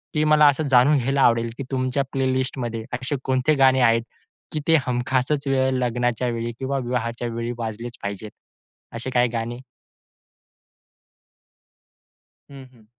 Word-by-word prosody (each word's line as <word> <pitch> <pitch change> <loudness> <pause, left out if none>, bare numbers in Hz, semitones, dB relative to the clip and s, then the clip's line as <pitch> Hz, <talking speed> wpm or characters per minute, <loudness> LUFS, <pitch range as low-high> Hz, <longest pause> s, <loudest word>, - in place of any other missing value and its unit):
ते 150 - +2
मला 150 -1 +5
असं 145 +2 +2
जाणून 130 +4 +5
घ्यायला 135 +2 0
आवडेल 115 -1 +3
की - - -4
तुमच्या 130 +1 0
प्लेलिस्टमध्ये 130 -3 -2
असे 125 +3 -2
कोणते 130 +3 +1
गाणे 130 0 +5
आहेत 115 -1 +4 0.5
की 155 - -2
ते 165 - +5
हमखासच 130 +3 0
वेळ 130 -1 +2
लग्नाच्या 120 0 0
वेळी 115 0 -3
किंवा 135 +1 -2
विवाहाच्या 120 -1 -3
वेळी 115 +1 -3
वाजलेच 115 +1 -6
पाहिजेत? 100 +1 -5 0.6
असे 120 +3 -4
काही 125 -1 +2
गाणे? 120 +1 -4 2.9
हं, 135 -1 -11
हं. 115 -3 -21
125 Hz, 135 wpm, -23 LUFS, 115-135 Hz, 2.9 s, मला